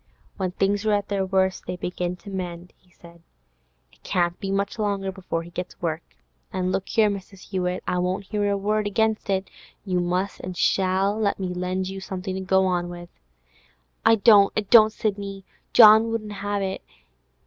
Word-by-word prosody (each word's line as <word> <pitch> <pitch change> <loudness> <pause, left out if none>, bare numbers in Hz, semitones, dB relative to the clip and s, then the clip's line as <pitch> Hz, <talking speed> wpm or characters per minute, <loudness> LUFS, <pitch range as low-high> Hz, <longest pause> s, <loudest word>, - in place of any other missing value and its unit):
'When 190 -2 -2
things 195 +3 0
are 215 -1 +2
at 205 -1 -1
the 195 -2 -1
worst 190 0 0
they 180 - -3
begin 180 0 -3
to 200 +3 -12
mend,' 180 -2 -6
he 180 - -32
said. 170 -1 -17 0.7
'It - - -27
can't 175 -1 -1
be 195 - -4
much 200 +3 -2
longer 200 -2 -1
before 180 -3 -4
he 170 - -12
gets 180 +1 -6
work. 165 -1 -2 0.5
And 185 -1 -1
look 195 - -2
here, 220 -2 +3
Mrs. 195 -1 -6
Hewett, 180 -2 -2
I 180 - 0
won't 180 +2 -1
hear 205 0 -1
a 200 - +1
word 210 +1 0
against 220 +1 0
it; 190 0 0 0.4
you 185 -2 0
must 180 +3 -1
and 180 -1 -7
shall 190 +1 +2
let 205 -2 0
me 185 -1 -2
lend 180 +1 -2
you 195 0 -6
something 190 0 -5
to 190 - -4
go 190 0 +2
on 175 -1 0
with!' 175 0 -9 0.9
'I 225 - +6
dursn't, 205 -2 +6
I - - +3
dursn't, 215 +1 +6
Sidney! 200 -3 -4 0.3
John 220 0 +8
won't 220 -2 -3
have 205 0 -3
it. 190 0 -3
190 Hz, 190 wpm, -24 LUFS, 180-205 Hz, 0.9 s, John